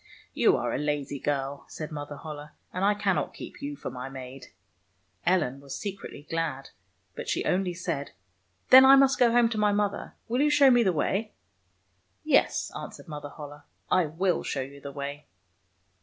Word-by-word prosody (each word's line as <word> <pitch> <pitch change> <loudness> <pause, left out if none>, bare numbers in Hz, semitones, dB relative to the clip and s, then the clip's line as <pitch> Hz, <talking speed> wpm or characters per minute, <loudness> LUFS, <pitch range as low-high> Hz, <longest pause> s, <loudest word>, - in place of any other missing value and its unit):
" - - -32
You - - +6
are - - -2
a - - -1
lazy 145 -1 -2
girl," 140 0 -2
said 155 -1 -7
Mother 145 -1 -6
Holle, 150 0 -8
" - - -40
and 185 - -2
I 205 +1 +4
cannot 195 -7 -1
keep - - -10
you 145 +1 -4
for - - -6
my 125 +1 -6
maid." 130 0 -9 0.8
Ellen 155 -8 +2
was 140 -1 -7
secretly 195 -7 -7
glad, 160 -5 -3 0.4
but - - -6
she - - -1
only 180 -1 0
said, 170 -5 -3 0.3
'' - - -43
Then 260 +1 +11
I 270 +1 +9
must 270 0 +4
go 240 -2 +5
home 240 0 +5
to 220 -2 -3
my 210 -1 +3
mother. 205 0 -1
Will 245 +4 0
you 300 - +4
show 290 -2 +6
me 245 -1 +5
the 195 -5 +3
way? 195 +7 -1 0.3
" 90 +1 -43
" 95 +1 -44
Yes," - - +2
answered - - -8
Mother 150 -2 -7
Holle, 145 0 -10 0.2
" - - -35
I 180 -3 +3
will 175 +4 0
show 135 - -3
you 140 +2 -9
the 140 - -7
way." 140 +1 -6
150 Hz, 200 wpm, -27 LUFS, 140-200 Hz, 0.8 s, Then